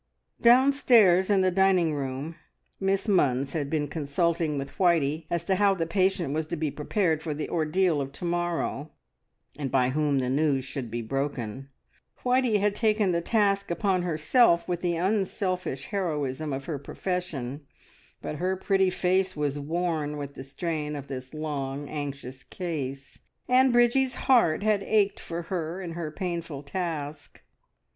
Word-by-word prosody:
Downstairs 235 Hz, -7 st, +5 dB
in 200 Hz, -2 st, +4 dB
the 185 Hz, 0 st, +3 dB
dining 185 Hz, -3 st, +3 dB
room 140 Hz, +3 st, -4 dB, 0.4 s
Miss 195 Hz, 0 st, +1 dB
Munns 140 Hz, -, +2 dB
had 145 Hz, -4 st, -2 dB
been 150 Hz, -1 st, 0 dB
consulting 160 Hz, +1 st, 0 dB
with 135 Hz, 0 st, -6 dB
Whitey 160 Hz, -4 st, +2 dB
as 170 Hz, -1 st, -2 dB
to 190 Hz, +1 st, +1 dB
how 200 Hz, -1 st, +4 dB
the 165 Hz, -3 st, -1 dB
patient 185 Hz, -3 st, +1 dB
was 155 Hz, 0 st, -2 dB
to 170 Hz, -, -3 dB
be 155 Hz, -2 st, -2 dB
prepared 160 Hz, +1 st, 0 dB
for 155 Hz, -2 st, -3 dB
the 150 Hz, -, -3 dB
ordeal 165 Hz, 0 st, +1 dB
of 135 Hz, 0 st, -5 dB
to 175 Hz, -, -7 dB
morrow, 175 Hz, -4 st, -2 dB, 0.7 s
and 140 Hz, -2 st, -2 dB
by 125 Hz, -1 st, +2 dB
whom 145 Hz, 0 st, +1 dB
the 130 Hz, -1 st, 0 dB
news 135 Hz, 0 st, +1 dB
should 130 Hz, -3 st, -5 dB
be 120 Hz, +1 st, -4 dB
broken. 135 Hz, 0 st, -3 dB, 0.5 s
Whitey 250 Hz, -3 st, +3 dB
had 205 Hz, 0 st, +2 dB
taken 215 Hz, -3 st, +2 dB
the 170 Hz, -1 st, 0 dB
task 200 Hz, 0 st, +1 dB
upon 185 Hz, +1 st, +1 dB
herself 170 Hz, -, +3 dB
with 175 Hz, -1 st, -2 dB
the 175 Hz, -1 st, 0 dB
unselfish 185 Hz, -, -1 dB
heroism 155 Hz, -7 st, -2 dB
of 135 Hz, 0 st, -4 dB
her 155 Hz, -5 st, -4 dB
profession, 145 Hz, -5 st, -4 dB, 0.6 s
but 150 Hz, -, -4 dB
her 185 Hz, +3 st, 0 dB
pretty 190 Hz, 0 st, +2 dB
face 185 Hz, +1 st, +1 dB
was 145 Hz, -1 st, -1 dB
worn 155 Hz, -1 st, -2 dB
with 140 Hz, -1 st, -6 dB
the 130 Hz, -, -8 dB
strain 150 Hz, +1 st, -3 dB
of 140 Hz, -1 st, -7 dB
this 130 Hz, -1 st, -6 dB
long 145 Hz, -2 st, -4 dB
anxious 140 Hz, -3 st, -6 dB
case, 140 Hz, -7 st, -5 dB, 0.3 s
and 255 Hz, +1 st, +5 dB
Bridgie's 240 Hz, +2 st, +3 dB
heart 230 Hz, -10 st, +3 dB
had 215 Hz, -2 st, +2 dB
ached 205 Hz, 0 st, +1 dB
for 170 Hz, +1 st, -5 dB
her 170 Hz, 0 st, -3 dB
in 180 Hz, -3 st, -5 dB
her 165 Hz, -2 st, -4 dB
painful 170 Hz, -3 st, -4 dB
task. 150 Hz, -2 st, -5 dB
165 Hz, 160 wpm, -27 LUFS, 145-190 Hz, 0.7 s, Downstairs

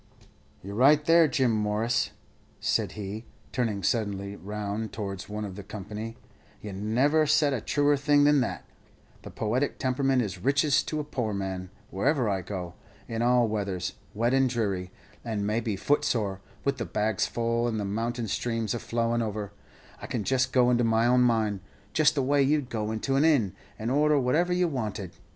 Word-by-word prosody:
"You're 100 Hz, +2 st, -7 dB
right, 145 Hz, +7 st, +5 dB
there, 165 Hz, -1 st, +6 dB
Jim 130 Hz, -5 st, +2 dB
Morris," 110 Hz, +2 st, 0 dB, 0.5 s
said -, -, 0 dB
he, 105 Hz, +2 st, -6 dB, 0.3 s
turning 110 Hz, -6 st, -1 dB
suddenly 100 Hz, -3 st, -1 dB
round 105 Hz, +2 st, -4 dB
towards 100 Hz, -3 st, -5 dB
one 105 Hz, 0 st, -4 dB
of 95 Hz, -2 st, -7 dB
the 100 Hz, -, -7 dB
company; 105 Hz, +3 st, -7 dB, 0.4 s
"you 105 Hz, -2 st, -7 dB
never 130 Hz, +10 st, +2 dB
said 150 Hz, -1 st, +3 dB
a 120 Hz, -, -2 dB
truer 145 Hz, +3 st, +2 dB
thing 145 Hz, +1 st, +3 dB
than 145 Hz, -1 st, +5 dB
that. 125 Hz, -, -3 dB, 0.6 s
The -, -, -9 dB
poetic 120 Hz, +6 st, -1 dB
temperament 130 Hz, 0 st, +1 dB
is 100 Hz, -, -5 dB
riches 140 Hz, +2 st, +3 dB
to 155 Hz, -, -2 dB
a -, -, -1 dB
poor 120 Hz, -8 st, -3 dB
man. 95 Hz, -1 st, -4 dB, 0.2 s
Wherever 130 Hz, +5 st, +1 dB
I 95 Hz, -2 st, 0 dB
go 90 Hz, -2 st, -6 dB, 0.3 s
in 115 Hz, 0 st, -3 dB
all 120 Hz, 0 st, +4 dB
weathers, 100 Hz, -4 st, -2 dB, 0.2 s
wet 120 Hz, +4 st, +1 dB
and 135 Hz, -1 st, +3 dB
dreary, 100 Hz, -7 st, -1 dB, 0.3 s
and 110 Hz, -4 st, -2 dB
maybe 110 Hz, 0 st, -1 dB
footsore, 105 Hz, -4 st, 0 dB, 0.2 s
with 140 Hz, -2 st, 0 dB
the -, -, -2 dB
bags 105 Hz, -2 st, 0 dB
full, 115 Hz, 0 st, 0 dB
and 110 Hz, -2 st, -1 dB
the 105 Hz, -, -2 dB
mountain 115 Hz, +3 st, -2 dB
streams 115 Hz, 0 st, -1 dB
all 120 Hz, -, -2 dB
flowin' 115 Hz, 0 st, 0 dB
over 105 Hz, -2 st, -3 dB, 0.5 s
I -, -, -6 dB
can 115 Hz, -, -2 dB
just 130 Hz, +2 st, +1 dB
go 125 Hz, -1 st, +4 dB
into 120 Hz, 0 st, +3 dB
my 115 Hz, 0 st, +3 dB
own 125 Hz, +1 st, +4 dB
mind, 110 Hz, -4 st, +2 dB, 0.3 s
just 155 Hz, -1 st, +4 dB
the 140 Hz, -, +1 dB
way 140 Hz, +2 st, +3 dB
you'd 140 Hz, -1 st, +1 dB
go 110 Hz, -1 st, -2 dB
into 135 Hz, +5 st, -1 dB
an 140 Hz, -, +4 dB
inn, 135 Hz, -, +3 dB, 0.2 s
and 110 Hz, +3 st, -3 dB
order 150 Hz, +1 st, +3 dB
whatever 155 Hz, +8 st, +1 dB
you 180 Hz, 0 st, +2 dB
wanted. 110 Hz, -, -4 dB
115 Hz, 180 wpm, -27 LUFS, 105-135 Hz, 0.6 s, there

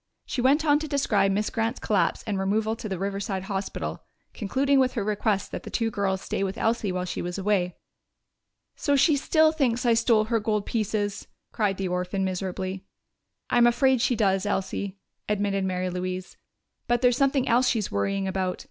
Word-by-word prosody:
She 250 Hz, -, -2 dB
went 285 Hz, +5 st, +3 dB
on 295 Hz, -1 st, +4 dB
to 310 Hz, -, -4 dB
describe 220 Hz, -9 st, +2 dB
Miss 210 Hz, +2 st, 0 dB
Grant's 230 Hz, +2 st, -1 dB
collapse 205 Hz, -3 st, 0 dB
and 205 Hz, -4 st, -2 dB
removal 215 Hz, +3 st, 0 dB
to 220 Hz, -2 st, -7 dB
the 190 Hz, -, -2 dB
Riverside 195 Hz, 0 st, -3 dB
Hospital, 195 Hz, 0 st, -4 dB, 0.3 s
concluding 270 Hz, +6 st, +1 dB
with 260 Hz, -1 st, +2 dB
her 230 Hz, -, -1 dB
request 210 Hz, -1 st, 0 dB
that -, -, -5 dB
the -, -, -9 dB
two 230 Hz, -1 st, -1 dB
girls 195 Hz, -2 st, -1 dB
stay 195 Hz, -, -2 dB
with 195 Hz, +2 st, -3 dB
Elsie 225 Hz, -4 st, 0 dB
while 180 Hz, 0 st, -2 dB
she 180 Hz, -, -4 dB
was 175 Hz, +1 st, -4 dB
away. 190 Hz, -3 st, 0 dB, 1.0 s
"So 285 Hz, -, +1 dB
she 285 Hz, +3 st, +4 dB
still 315 Hz, +2 st, +3 dB
thinks 255 Hz, -6 st, 0 dB
I 235 Hz, -, +5 dB
stole 230 Hz, -1 st, +3 dB
her 230 Hz, +1 st, 0 dB
gold 210 Hz, -1 st, -1 dB
pieces!" 210 Hz, -2 st, -2 dB, 0.2 s
cried 205 Hz, -3 st, 0 dB
the 195 Hz, -, -2 dB
orphan 180 Hz, +2 st, -1 dB
miserably. 185 Hz, 0 st, -3 dB, 0.7 s
"I'm 240 Hz, 0 st, +5 dB
afraid 260 Hz, +1 st, +3 dB
she 245 Hz, -, +2 dB
does, 195 Hz, -4 st, +2 dB
Elsie," 195 Hz, +1 st, -2 dB, 0.3 s
admitted 200 Hz, -2 st, 0 dB
Mary 185 Hz, -1 st, -1 dB
Louise. 185 Hz, +1 st, -4 dB, 0.5 s
"But 240 Hz, +1 st, +1 dB
there's 245 Hz, -1 st, +5 dB
something 275 Hz, -1 st, +2 dB
else 245 Hz, +2 st, +4 dB
she's 220 Hz, -5 st, -1 dB
worrying 195 Hz, -, -1 dB
about. 190 Hz, -1 st, -2 dB
210 Hz, 185 wpm, -26 LUFS, 190-240 Hz, 1.0 s, I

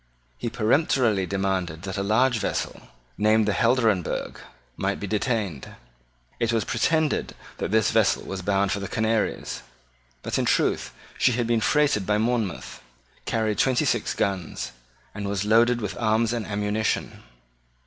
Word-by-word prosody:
He -, -, -2 dB
peremptorily 115 Hz, -, +2 dB
demanded 95 Hz, -4 st, -2 dB
that 95 Hz, -2 st, -4 dB
a 100 Hz, -, -1 dB
large 110 Hz, +4 st, +2 dB
vessel, -, -, -3 dB, 0.3 s
named 110 Hz, 0 st, +3 dB
the 105 Hz, -, +2 dB
Helderenbergh, 115 Hz, -7 st, +1 dB, 0.4 s
might 100 Hz, +1 st, -2 dB
be -, -, -4 dB
detained. 105 Hz, -, -2 dB, 0.6 s
It 115 Hz, 0 st, +1 dB
was 115 Hz, -2 st, +1 dB
pretended 160 Hz, -2 st, 0 dB, 0.2 s
that -, -, -2 dB
this 110 Hz, +1 st, +3 dB
vessel 110 Hz, -3 st, +2 dB
was 95 Hz, -1 st, -5 dB
bound 100 Hz, +1 st, +1 dB
for 100 Hz, -, -1 dB
the 100 Hz, -, -4 dB
Canaries. 110 Hz, -, -1 dB, 0.6 s
But -, -, -1 dB
in -, -, +1 dB
truth, -, -, +1 dB, 0.3 s
she 125 Hz, -, +4 dB
had 120 Hz, 0 st, 0 dB
been 115 Hz, -1 st, +1 dB
freighted 140 Hz, -8 st, +2 dB
by 105 Hz, 0 st, +2 dB
Monmouth, 110 Hz, -3 st, -2 dB, 0.4 s
carried 110 Hz, -2 st, 0 dB
twenty 130 Hz, -2 st, +3 dB
six -, -, 0 dB
guns, 90 Hz, -10 st, -2 dB, 0.4 s
and 100 Hz, -1 st, -4 dB
was 100 Hz, 0 st, -1 dB
loaded 115 Hz, +3 st, +4 dB
with 105 Hz, -, -3 dB
arms 115 Hz, 0 st, +2 dB
and 115 Hz, -3 st, -3 dB
ammunition. 105 Hz, +1 st, -1 dB
110 Hz, 150 wpm, -25 LUFS, 100-115 Hz, 0.6 s, she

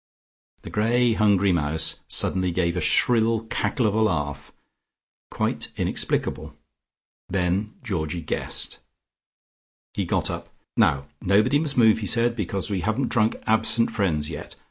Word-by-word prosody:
The -, -, -9 dB
grey 115 Hz, +3 st, +2 dB
hungry 100 Hz, -3 st, +3 dB
mouse 80 Hz, -2 st, 0 dB
suddenly 95 Hz, -1 st, +1 dB
gave 85 Hz, 0 st, 0 dB
a 90 Hz, -, -1 dB
shrill 115 Hz, +5 st, +2 dB
cackle 125 Hz, -, 0 dB
of 105 Hz, -, +2 dB
a 110 Hz, -, +1 dB
laugh, 75 Hz, -8 st, -1 dB, 0.8 s
quite -, -, -2 dB
inexplicable. 75 Hz, +1 st, -1 dB, 0.7 s
Then 95 Hz, +3 st, -1 dB
Georgie 85 Hz, -7 st, -3 dB
guessed. -, -, -2 dB, 1.1 s
He -, -, -2 dB
got -, -, 0 dB
up. -, -, -7 dB, 0.3 s
"Now 70 Hz, 0 st, +2 dB, 0.2 s
nobody 105 Hz, +9 st, +3 dB
must 150 Hz, -3 st, -1 dB
move," 110 Hz, -2 st, +5 dB
he 105 Hz, -, -3 dB
said, 115 Hz, +3 st, +1 dB
"because 100 Hz, -2 st, -2 dB
we 95 Hz, -2 st, -1 dB
haven't 110 Hz, +8 st, -1 dB
drunk 110 Hz, -2 st, +2 dB
'absent 110 Hz, +1 st, +3 dB
friends' 80 Hz, -8 st, 0 dB
yet. 80 Hz, -, -8 dB
100 Hz, 135 wpm, -24 LUFS, 85-115 Hz, 1.1 s, move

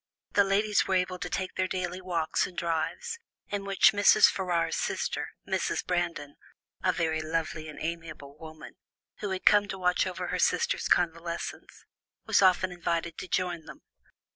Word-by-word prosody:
The 200 Hz, -, +5 dB
ladies 205 Hz, +2 st, +2 dB
were 190 Hz, -, +1 dB
able 180 Hz, 0 st, 0 dB
to -, -, -4 dB
take 185 Hz, -1 st, -3 dB
their 185 Hz, 0 st, 0 dB
daily 185 Hz, 0 st, -3 dB
walks 170 Hz, -3 st, 0 dB
and 180 Hz, -, -14 dB
drives, 170 Hz, -, -2 dB, 0.3 s
in 200 Hz, -1 st, -3 dB
which 195 Hz, -1 st, +5 dB
Mrs. 205 Hz, 0 st, +6 dB
Ferrars's 175 Hz, -3 st, -1 dB
sister, -, -, -2 dB, 0.2 s
Mrs. -, -, -1 dB
Brandon, 170 Hz, -5 st, -2 dB, 0.5 s
a 185 Hz, -, +4 dB
very 160 Hz, -2 st, -1 dB
lovely 155 Hz, 0 st, -3 dB
and 150 Hz, -, -10 dB
amiable 160 Hz, -4 st, -6 dB
woman, 155 Hz, +2 st, -11 dB, 0.4 s
who 205 Hz, -, -3 dB
had 190 Hz, -1 st, -4 dB
come 205 Hz, -1 st, +6 dB
to 195 Hz, -, -5 dB
watch 180 Hz, 0 st, +1 dB
over 185 Hz, -, -4 dB
her -, -, -2 dB
sister's 480 Hz, +2 st, +1 dB
convalescence, 170 Hz, 0 st, -2 dB, 0.4 s
was -, -, +3 dB
often 185 Hz, -1 st, +4 dB
invited 170 Hz, -1 st, -2 dB
to -, -, -6 dB
join 175 Hz, -3 st, -1 dB
them. -, -, -12 dB
180 Hz, 165 wpm, -28 LUFS, 165-190 Hz, 0.5 s, Mrs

